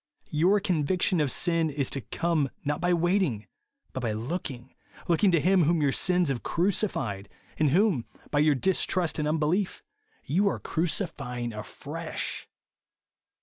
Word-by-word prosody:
Your 180 +7 +3
conviction 180 -1 +1
of 145 - +1
sin 165 +3 +2
is 140 -2 -1
to 135 - -2
come 160 +4 0 0.2
not 150 +1 -1
by 175 +1 +2
waiting, 175 - +1 0.5
but - - -3
by 115 -4 -1
looking; 125 +1 -5 0.3
looking 175 +4 +3
to 170 -3 +3
Him 180 +1 +3
whom 170 +2 +2
your 145 -2 +2
sins 180 +1 +2
have 130 -3 -2
crucified, 170 - -1 0.3
and 155 -2 +4
whom, 175 - +2 0.3
by 145 - +2
your 150 -1 +4
distrust 180 +1 +1
and 150 - 0
unbelief, 160 +5 0 0.4
you 195 +7 +2
are - - +1
crucifying 140 - -2
afresh. 105 0 -5
160 Hz, 145 wpm, -27 LUFS, 135-180 Hz, 0.5 s, and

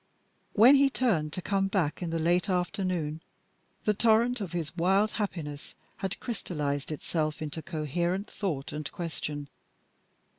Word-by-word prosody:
When 235 +6 +8
he 275 0 +5
turned 195 - +1
to 185 - -4
come 195 -1 +1
back 185 -6 0
in 175 - -2
the 165 - -1
late 175 +4 +2
afternoon, 180 -4 -1 0.6
the 210 - +4
torrent 230 +3 +3
of 190 -4 -4
his 170 -2 -3
wild 195 +5 +3
happiness 155 -9 -4 0.2
had 195 +1 -3
crystallised 150 - -3
itself 155 0 -2
into 155 +1 -4
coherent 170 +5 -1
thought 155 -10 -3
and 150 -1 -4
question. 150 -4 -4
175 Hz, 140 wpm, -29 LUFS, 155-200 Hz, 0.6 s, When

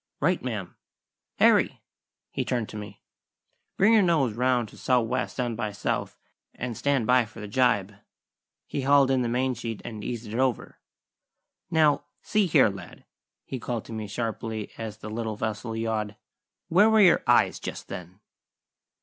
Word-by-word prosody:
"Right, 180 +5 +1
ma'am. 105 -8 -5 0.6
Harry!" - - +4 0.5
he - - -2
turned 120 -4 -2
to - - -10
me 105 -1 -9 0.7
"bring 215 +4 +5
her 220 - +6
nose 160 - +2
round 125 0 +1
to - - -15
sou' 125 -1 +3
west 125 +3 -3
and 120 -2 -1
by 105 -2 -3
south, 100 - -3 0.4
and 125 -1 -4
stand 140 -1 +1
by 125 +1 +4
for 105 - -13
the 105 - -6
gybe." 105 -4 +1 0.7
He 140 - -3
hauled 140 0 +4
in 130 -1 +2
the 120 - 0
main 130 +2 +1
sheet 115 -2 -5
and 110 -2 -6
eased 120 0 -4
it 120 - -2
over. 130 -3 -1 0.9
"Now, 155 -3 +3 0.2
see 210 -3 +2
here, 145 - +5
lad," 95 -3 -10 0.4
he 130 - -5
called 115 -1 -4
to - - -9
me 110 -1 -4
sharply 110 0 -4
as 110 -2 -6
the 110 - -8
little 110 -1 -3
vessel 110 +1 -3
yawed: 110 -2 -2 0.5
"where 200 +6 +5
were 220 0 +4
your 180 -4 +6
eyes - - +4
just - - -6
then?" 90 +3 -9
120 Hz, 165 wpm, -26 LUFS, 110-130 Hz, 0.9 s, her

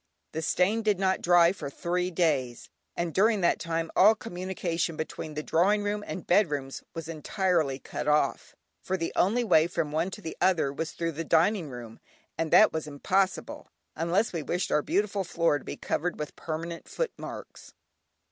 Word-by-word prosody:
The 160 - -3
stain 185 +7 +1
did 210 -3 +1
not 190 0 +1
dry 175 -1 +5
for 185 -7 -6
three 180 +5 -2
days, 145 -9 -1 0.3
and 170 -2 -2
during 215 +1 +3
that 170 - +2
time 165 -1 -2
all 215 +3 +7
communication 180 -5 -3
between 155 -1 -5
the 150 - -3
drawing 200 +7 +2
room 205 0 -2
and 185 - -6
bedrooms 150 -8 +1
was 165 -1 -5
entirely 165 -3 0
cut - - -6
off, 150 0 +1 0.3
for 190 - -2
the 165 -2 -3
only 230 +6 +2
way 170 -7 +4
from 165 -3 -2
one 160 +4 0
to 210 - -9
the 160 - -5
other 175 -7 +2
was 160 +3 -4
through 165 -1 -2
the 165 +1 -4
dining 165 +1 +2
room, 120 -3 -9 0.4
and 165 0 -2
that 215 - +6
was 160 -1 -3
impossible, 185 +6 -1 0.3
unless 180 +7 0
we 165 - -2
wished 175 +5 -2
our 150 - +3
beautiful 200 +3 0
floor 165 -4 +1
to - - -16
be - - -6
covered 175 +3 -2
with 150 - -6
permanent 165 +1 -5
foot - - -2
marks. - - -10
170 Hz, 180 wpm, -28 LUFS, 155-190 Hz, 0.4 s, all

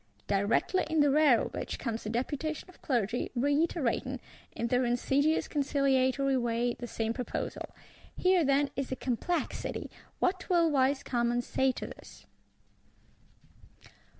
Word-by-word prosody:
Directly 205 - +1
in 320 -1 +3
the 290 -1 +4
rear 290 -5 +5
of - - -5
which - - -4
comes 230 -3 -4
a - - -2
deputation 290 - -3
of 365 - -18
Clergy, 240 -4 0
reiterating, 285 -1 0 0.3
in 235 - -3
their 250 +2 +2
insidious 270 +6 +1
conciliatory 275 -2 +2
way, 240 0 0
the 240 - -7
same 225 -1 -2
proposal. 250 -1 -4 0.5
Here, 365 -2 +4
then, 280 0 +2
is 275 -1 -3
a - - 0
complexity: 260 +8 -2 0.3
what 370 +2 -1
will 340 -3 +4
wise 270 0 +2
Commons 240 0 0
say 265 0 +2
to - - -6
this? - - -12
265 Hz, 135 wpm, -30 LUFS, 240-295 Hz, 0.5 s, rear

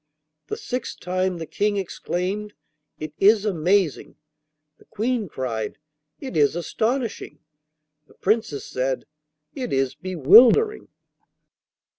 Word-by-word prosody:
The 430 - -4
sixth 255 - -5
time 185 0 -1
the 165 - -5
King 205 +5 -1
exclaimed, 195 +2 -3 0.4
'It 155 -1 -7
is 205 +1 +5
amazing!' 185 -3 +1 0.6
The - - -21
Queen 225 -2 -2
cried, 115 -6 -4 0.4
'It 265 - -7
is 150 0 +3
astonishing!' 225 +7 -2 0.7
The - - -22
Princess 215 -8 -1
said, 130 +1 -2 0.5
'It 255 -2 -5
is 135 -1 +1
bewildering! 190 - +5
190 Hz, 105 wpm, -23 LUFS, 155-225 Hz, 0.7 s, is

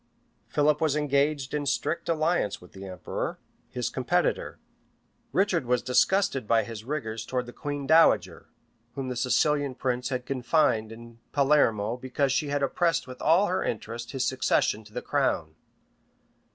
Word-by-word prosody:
Philip 150 0 +2
was 155 -3 +2
engaged 140 -1 0
in 150 - 0
a 145 - -5
strict 155 +5 -1
alliance 160 - +1
with 90 - -16
the 95 0 -9
emperor, 90 -2 -4 0.3
his 125 -1 -3
competitor: 175 - 0 0.7
Richard 180 -9 +1
was 125 0 +1
disgusted 135 - +2
by 115 0 +3
his 115 -2 -8
rigors 115 -5 -4
towards 125 +1 -2
the 120 - -10
queen 145 -1 -4
dowager, 160 +4 +4 0.5
whom 135 -2 -4
the 125 - -3
Sicilian 140 +2 +1
prince 125 -1 -2
had 125 -2 -3
confined 125 -4 +1
in 115 0 -12
Palermo 125 -6 +2
because 130 +2 -1
she 140 +3 0
had 145 0 -1
opposed 170 +4 +1
with 130 -1 -10
all 170 +6 +4
her 185 -1 0
interest 115 +2 -4
his 135 -2 -1
succession 130 -4 +1
to 105 - -16
the - - -5
crown. - - 0
135 Hz, 155 wpm, -27 LUFS, 120-150 Hz, 0.7 s, dowager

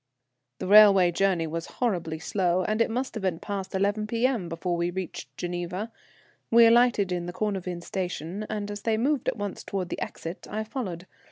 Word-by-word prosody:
The - - -5
railway 195 -3 +7
journey 180 -2 +1
was 165 +2 -4
horribly 175 -10 -1
slow, 180 +1 0
and 215 +4 0
it 230 - +3
must 255 +4 -2
have 220 - -5
been 185 -3 0
past 195 0 -5
11 205 +2 0
P.M. 230 -4 0
before 175 +1 -2
we 170 0 0
reached 185 -1 -6
Geneva. 175 +5 -4 0.6
We 230 0 +7
alighted 230 -4 +4
in 175 -1 -2
the 175 - -5
Cornavin 185 -4 -3
station, 180 +2 -4
and 205 -1 -3
as 205 0 -6
they 225 -1 +1
moved 275 +3 0
at - - 0
once 205 -2 -4
towards 185 -3 -4
the - - -4
exit 165 +2 -6
I 215 +1 -2
followed. 195 -7 -5
195 Hz, 185 wpm, -27 LUFS, 175-215 Hz, 0.6 s, railway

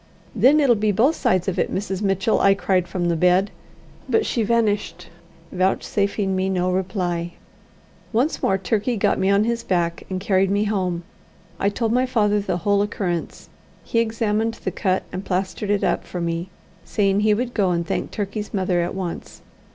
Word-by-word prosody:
"Then 290 +4 +5
it'll 275 -5 +5
be 215 -1 +1
both 255 - +3
sides 185 0 +1
of 190 - -1
it, - - 0
Mrs. 195 0 -3
Mitchell," 195 +1 +1
I 195 0 +5
cried 185 -2 0
from 175 -2 -2
the 170 - +1
bed; 180 +4 +3 0.6
but 445 - +2
she 235 - 0
vanished, 215 -2 0 0.4
vouchsafing 195 +1 0
me 190 +1 0
no 185 -1 0
reply. 180 -2 -2 0.8
Once 250 +8 0
more 190 - +2
Turkey 215 +5 -1
got - - +1
me 190 - +2
on 200 +1 +4
his 235 +1 -1
back 170 -4 -1
and 185 -1 -2
carried 190 0 +2
me 200 +1 +1
home. 185 -5 -1 0.6
I 200 - +2
told 225 +2 -1
my 250 +2 +2
father 210 -4 +2
the 200 -3 -2
whole 200 -1 +3
occurrence. 185 -4 -3 0.3
He 230 - 0
examined 225 0 0
the - - -4
cut 190 -3 0
and 185 - -5
plastered 190 +2 -2
it 205 -1 +1
up - - +1
for 180 - -6
me, 170 +1 -2 0.3
saying 200 -2 +1
he 210 0 +3
would 245 +2 -3
go 195 -4 +2
and 170 -1 0
thank - - -2
Turkey's 205 0 -4
mother 185 -2 +1
at 170 - -3
once. 185 -3 -6
195 Hz, 180 wpm, -22 LUFS, 185-215 Hz, 0.8 s, Then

